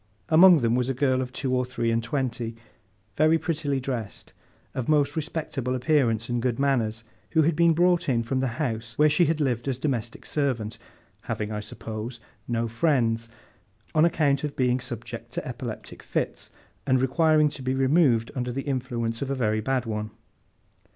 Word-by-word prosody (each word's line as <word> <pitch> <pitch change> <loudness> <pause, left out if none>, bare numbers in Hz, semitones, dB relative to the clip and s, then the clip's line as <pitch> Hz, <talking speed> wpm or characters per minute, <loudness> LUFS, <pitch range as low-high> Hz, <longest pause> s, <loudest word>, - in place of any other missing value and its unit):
Among 170 -1 +7
them 115 -1 +2
was 125 +1 +1
a 135 - -1
girl 130 -1 +2
of 125 -1 -4
two 130 0 -2
or 125 - +2
three 125 -2 -1
and 115 0 +1
twenty, 120 -2 -2 0.6
very 155 +1 +4
prettily 155 -5 -1
dressed, 125 -6 -5 0.4
of 130 +1 -3
most 150 -1 +3
respectable 150 -5 -3
appearance 125 -5 +1
and 120 -1 -1
good 120 -1 0
manners, 115 -5 0 0.3
who 160 -1 +5
had 160 +1 +2
been 170 +1 +4
brought 175 -1 +2
in 115 -3 +2
from 130 +3 -1
the 130 - +1
house 115 -5 -3
where 150 0 +5
she 175 - +4
had 160 0 0
lived 125 -4 0
as 130 -3 0
domestic 125 -5 -3
servant 125 -7 -2 0.5
(having, 105 0 -2
I 105 - -3
suppose, 110 +2 -7 0.3
no 115 -1 0
friends), 115 -3 +1 0.6
on 155 -1 +4
account 150 -5 +2
of 150 -1 -3
being 125 -1 +2
subject 120 -2 -7
to - - -4
epileptic - - -7
fits, - - -3 0.4
and 130 0 +4
requiring 155 +3 +3
to 140 - -7
be 130 +1 -1
removed 130 -4 +3
under 125 -1 -2
the 135 +2 -3
influence 120 -4 -2
of 140 - -2
a 140 - 0
very 110 -4 0
bad 130 +2 0
one. 105 -1 -3
130 Hz, 180 wpm, -26 LUFS, 115-145 Hz, 0.6 s, Among